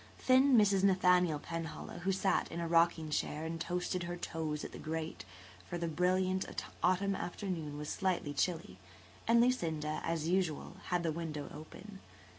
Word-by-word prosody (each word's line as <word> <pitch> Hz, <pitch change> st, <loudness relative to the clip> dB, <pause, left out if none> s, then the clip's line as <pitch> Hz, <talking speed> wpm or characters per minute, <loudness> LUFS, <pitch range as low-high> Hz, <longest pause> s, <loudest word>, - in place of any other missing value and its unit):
Thin 260 Hz, +1 st, +5 dB
Mrs. 200 Hz, -3 st, +4 dB
Nathaniel 180 Hz, -4 st, +4 dB
Penhallow 165 Hz, +2 st, -6 dB
sat 190 Hz, 0 st, +1 dB
in 170 Hz, -, -4 dB
a 170 Hz, -, -2 dB
rocking 165 Hz, -2 st, +3 dB
chair 150 Hz, +1 st, -1 dB
and 165 Hz, 0 st, -4 dB
toasted 180 Hz, +1 st, -1 dB
her 175 Hz, 0 st, -4 dB
toes 155 Hz, -3 st, -3 dB
at -, -, -7 dB
the -, -, -9 dB
grate, 155 Hz, -, -4 dB, 0.4 s
for 175 Hz, -, -2 dB
the 170 Hz, 0 st, -2 dB
brilliant 185 Hz, +3 st, +1 dB, 0.4 s
autumn 195 Hz, +2 st, +2 dB
afternoon 175 Hz, -6 st, -4 dB
was 150 Hz, 0 st, -5 dB
slightly 185 Hz, -7 st, -1 dB
chilly, 160 Hz, -, -1 dB, 0.5 s
and 230 Hz, +1 st, +6 dB
Lucinda, 160 Hz, -11 st, +1 dB
as 165 Hz, -1 st, -1 dB
usual, 175 Hz, -4 st, 0 dB
had 175 Hz, -1 st, 0 dB
the 165 Hz, -, +1 dB
window 155 Hz, -3 st, -5 dB
open. 195 Hz, +6 st, -10 dB
170 Hz, 155 wpm, -34 LUFS, 160-185 Hz, 0.5 s, and